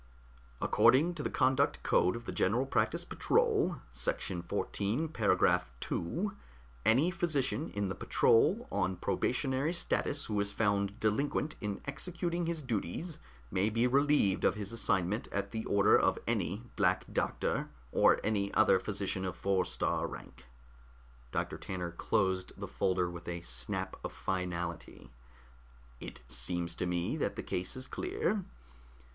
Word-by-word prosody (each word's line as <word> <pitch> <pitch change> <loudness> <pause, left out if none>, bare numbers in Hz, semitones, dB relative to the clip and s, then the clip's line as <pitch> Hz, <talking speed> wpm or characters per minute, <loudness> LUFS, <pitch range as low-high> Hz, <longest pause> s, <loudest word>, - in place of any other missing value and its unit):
According 160 +7 +4
to 165 - -5
the - - -1
conduct 130 +2 +2
code 90 - +3
of 120 0 -7
the - - -4
General 115 +8 +1
Practice 135 - +1
Patrol, - - +2 0.2
section 65 +7 -1
XIV, 105 - -2
paragraph 95 - +3
2, 195 - -2 0.5
any 140 +11 +4
physician 155 -4 0
in 100 -1 -2
the 95 - -2
patrol 190 - +3
on 95 -2 0
probationary 130 - 0
status 145 -4 +1
who 105 -2 -1
is 100 0 +1
found 100 -1 0
delinquent 140 +7 0
in 105 -2 -3
executing 170 +3 -2
his 165 -3 -2
duties 130 - -3 0.3
may 95 +3 +2
be 115 +2 +1
relieved 140 -6 +3
of - - +3
his 105 -1 -4
assignment 100 -2 0
at 100 0 -3
the 110 -1 -4
order 100 -1 +5
of - - +2
any 100 +8 -1
Black 90 -3 +2
Doctor, - - -1 0.2
or - - +5
any 100 -2 0
other 95 - +5
physician 100 -1 -2
of 95 -3 -3
four 95 -2 +1
star - - -1
rank." 65 +1 -10 0.9
Doctor - - -2
Tanner 90 -2 -4
closed 95 +1 0
the - - -5
folder 90 -1 0
with 85 -1 -8
a 85 -1 -4
snap 60 -4 -2
of - - -4
finality. 90 -5 -4 0.9
"It - - -8
seems 85 +8 -1
to 90 - -2
me 90 -1 -1
that - - -1
the - - -5
case 90 +6 -3
is 130 0 -5
clear. 365 - -1
100 Hz, 145 wpm, -32 LUFS, 90-140 Hz, 0.9 s, order